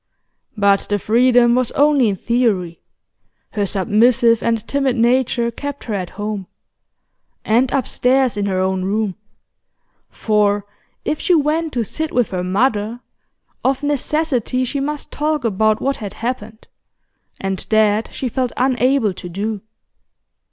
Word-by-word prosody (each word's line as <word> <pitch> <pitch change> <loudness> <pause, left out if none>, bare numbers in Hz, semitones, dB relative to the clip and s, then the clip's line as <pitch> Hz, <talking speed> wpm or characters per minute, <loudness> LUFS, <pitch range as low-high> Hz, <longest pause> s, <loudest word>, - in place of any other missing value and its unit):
But 200 -1 +3
the 205 - +1
freedom 240 +3 +4
was 250 -1 +1
only 285 -5 +4
in 200 - -1
theory; 200 -6 0 0.7
her 205 -1 -1
submissive 230 +4 +3
and 230 -2 -1
timid 275 -3 0
nature 240 0 +2
kept 285 +4 -6
her 225 - -4
at 185 -3 -3
home 205 -1 -5 1.0
and 245 +4 +2
upstairs 260 -1 +1
in 205 -1 -1
her 190 -1 0
own 190 0 0
room; 205 +1 -1 1.0
for, 205 -2 +1 0.4
if 305 - -1
she 360 - +3
went 310 +1 0
to 240 - 0
sit 315 +8 -4
with 245 -2 +1
her 180 -1 -2
mother, 215 +4 0 0.6
of 270 +2 0
necessity 285 -3 0
she 280 +3 -3
must 295 +1 -4
talk 300 -1 -1
about 215 0 +2
what 275 +1 0
had 205 -4 -6
happened, 235 -2 -5 0.7
and 195 -1 -2
that 215 0 +2
she 260 - -4
felt 250 0 -1
unable 255 -3 +2
to 180 -1 -9
do. 205 +3 -3
235 Hz, 135 wpm, -19 LUFS, 205-260 Hz, 1.0 s, freedom